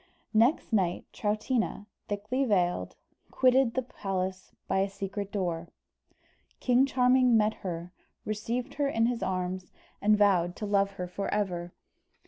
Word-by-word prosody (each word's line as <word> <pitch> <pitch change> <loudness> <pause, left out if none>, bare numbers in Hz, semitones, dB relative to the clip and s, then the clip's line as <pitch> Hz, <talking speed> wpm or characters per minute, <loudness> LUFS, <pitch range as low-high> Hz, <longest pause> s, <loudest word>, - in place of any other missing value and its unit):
Next 230 +3 +3
night 180 -4 +1
Troutina, 215 0 -1 0.2
thickly 210 +6 -1
veiled, 180 - +1 0.3
quitted 255 -2 +3
the 260 - +1
palace 190 -5 -4 0.2
by 190 - +1
a 195 +1 +1
secret 195 +1 -5
door. 175 -4 -2 0.9
King 255 +2 +4
Charming 250 -2 +4
met 215 0 +3
her, 175 -1 -5 0.3
received 235 +5 -3
her 285 0 0
in 225 -5 +2
his 240 0 -1
arms, 185 -1 -2 0.3
and 210 +1 +4
vowed 185 -4 +3
to 210 - -5
love 200 -1 +2
her 180 -2 -4
for 195 +3 -4
ever. 180 -4 -1
205 Hz, 135 wpm, -29 LUFS, 185-240 Hz, 0.9 s, King